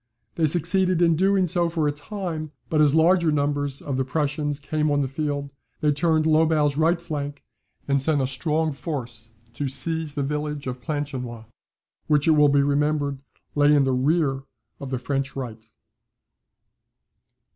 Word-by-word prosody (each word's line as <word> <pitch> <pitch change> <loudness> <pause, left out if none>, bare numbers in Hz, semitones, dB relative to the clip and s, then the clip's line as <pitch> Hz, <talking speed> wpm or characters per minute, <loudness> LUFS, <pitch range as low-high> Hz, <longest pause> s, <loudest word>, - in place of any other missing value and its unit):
They 160 -2 +1
succeeded 180 +3 +1
in 170 -2 +4
doing 190 +2 +3
so 175 0 +2
for 160 -3 0
a - - +2
time; 155 0 -5 0.2
but 155 -1 +3
as 150 -1 +4
larger 170 0 +4
numbers 145 -1 -1
of 140 -3 -3
the 130 - +1
Prussians 145 +1 -2
came 155 +1 -1
on 145 0 +2
the - - -1
field, 145 0 -3 0.3
they 150 - +2
turned 155 +1 +1
Lobau's 155 -2 +3
right 165 +3 +2
flank, 145 -4 -5 0.4
and 140 -1 +2
sent 150 +1 +2
a 135 - +1
strong 155 +4 0
force 125 -7 -6 0.2
to 140 +3 -3
seize 155 +3 -1
the 145 - -1
village 150 0 -3
of 125 -1 -5
Planchenoit, 130 -6 -4 0.6
which, 150 0 +2
it - - +6
will 150 -1 +5
be 140 0 +3
remembered, 145 -1 0 0.3
lay 145 0 +4
in 145 - +4
the 135 -1 +1
rear 135 +1 +1 0.4
of 140 - -6
the 130 - -2
French 135 +2 -3
right. 115 -4 -7
145 Hz, 165 wpm, -24 LUFS, 140-160 Hz, 0.6 s, it